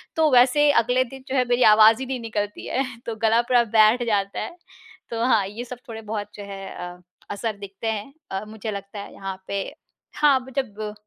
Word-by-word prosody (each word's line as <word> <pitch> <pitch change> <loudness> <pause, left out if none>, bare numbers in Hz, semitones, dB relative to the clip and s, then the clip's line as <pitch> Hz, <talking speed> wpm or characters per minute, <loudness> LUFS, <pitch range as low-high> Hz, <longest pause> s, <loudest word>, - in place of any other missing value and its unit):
तो 315 -1 +4
वैसे 255 +4 +5
अगले 250 +2 +2
दिन 260 +1 -11
जो 265 - -3
है 250 -1 +3
मेरी 245 +1 +3
आवाज़ 220 +2 +7
ही 265 - -3
नहीं 260 -1 -3
निकलती 210 -2 -4
है 265 +2 0 0.2
तो 230 -1 -4
गला 225 +2 +4
पूरा 240 0 +3
बैठ 220 +3 +6
जाता 200 -2 0
है। 345 - -5 0.5
तो 230 0 -2
हाँ, 220 -6 +3
ये 220 +4 -6
सब 250 0 -8
थोड़े-बहुत 220 -2 -5
जो 205 - -8
है 195 -1 -8 0.3
अ, 180 - -20 0.3
असर 205 +1 -3
दिखते 200 +2 -7
हैं 220 +6 -5 0.2
अ, 195 +2 -3
मुझे 215 0 -6
लगता 200 +1 -7
है - - -9
यहाँ 195 -1 -5
पे। 200 -1 -2 0.5
हाँ, 285 -3 +4
ब - - -11
जब 215 -4 -3
220 Hz, 205 wpm, -23 LUFS, 205-250 Hz, 0.5 s, आवाज़